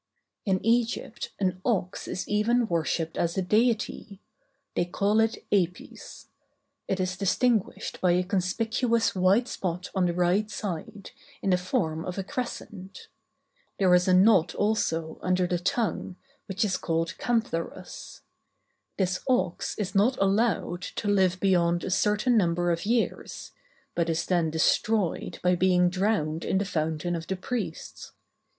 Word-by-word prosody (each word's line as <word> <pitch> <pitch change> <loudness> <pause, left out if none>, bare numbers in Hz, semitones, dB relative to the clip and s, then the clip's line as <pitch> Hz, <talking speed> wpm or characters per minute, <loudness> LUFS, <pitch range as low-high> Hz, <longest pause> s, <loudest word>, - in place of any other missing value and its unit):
In 190 -1 0
Egypt 235 +1 0
an 185 -2 -1
ox 190 -7 -1
is 185 - -4
even 230 +3 +2
worshipped 165 -1 -1
as 170 +1 0
a - - +2
deity; 215 -1 0 0.6
they - - +2
call 200 +5 +1
it 225 0 +2
Apis. 180 -3 -2 0.6
It 190 - -1
is 185 0 -1
distinguished 215 +3 0
by 180 -1 +4
a 180 +1 +2
conspicuous 220 +5 0
white 195 +6 +3
spot 180 -4 -4
on 185 -2 +2
the 170 - -2
right 180 +4 +2
side, 200 -1 -6 0.3
in 195 - +1
the 180 - +4
form 165 -3 -1
of 180 - -5
a 195 - -2
crescent. 200 -4 -6 0.7
There 185 -2 +4
is 180 +1 +4
a 185 - +4
knot 185 -2 +4
also 165 -7 -1
under 185 0 +1
the 175 0 -1
tongue, 195 0 -1 0.3
which 200 +1 0
is 195 - 0
called 165 0 -1
"cantharus." 225 -8 -3 0.8
This 185 -2 0
ox 220 -9 0
is 200 -3 -3
not 220 +6 +3
allowed 195 -3 +1
to 205 - -4
live 190 -3 +2
beyond 175 -3 +2
a - - -3
certain 210 +5 +2
number 175 -3 +2
of 170 +4 -2
years; 235 0 -2 0.4
but 170 -1 0
is 165 0 0
then 175 -3 +1
destroyed 185 +4 +1
by 180 0 +4
being 180 0 +3
drowned 185 -5 0
in - - 0
the 200 - 0
fountain 160 -1 -2
of 165 0 -6
the 190 - -1
priests. 240 +6 -5
185 Hz, 145 wpm, -27 LUFS, 175-210 Hz, 0.8 s, by